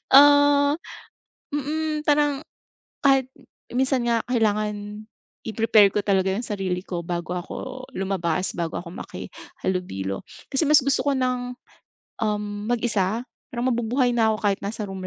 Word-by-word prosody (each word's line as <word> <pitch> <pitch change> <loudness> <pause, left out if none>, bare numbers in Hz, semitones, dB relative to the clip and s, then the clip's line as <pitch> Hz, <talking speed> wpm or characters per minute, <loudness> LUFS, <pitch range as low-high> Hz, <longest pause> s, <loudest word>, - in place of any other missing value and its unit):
oh, 285 +1 +7 0.7
mm, 305 +1 -2
parang 290 -1 +3 0.7
kahit 265 -1 +4 0.4
minsan 260 0 +1
nga 235 -1 +2
kailangan 210 -2 -1 0.4
i-prepare 220 -2 +4
ko 210 - +1
talaga 190 -1 +2
yung 230 - -2
sarili 190 -4 -2
ko 170 -3 -5
bago 175 0 -2
ako 260 +8 -7
lumabas 185 -2 -1
bago 170 0 -2
ako 170 - -9
makihalobilo 180 - -5 0.2
kasi 275 +3 +1
mas 295 -2 +6
gusto 275 +1 +1
ko 280 - +3
ng 250 -1 -1 0.7
um 210 -1 -2
mag-isa 225 -3 0 0.3
parang 245 +2 0
mabubuhay 245 +2 +1
na 225 -2 +3
ako - - -2
kahit 195 - -2
nasa 215 +1 -4
room 190 -2 -5
225 Hz, 130 wpm, -24 LUFS, 195-265 Hz, 0.7 s, oh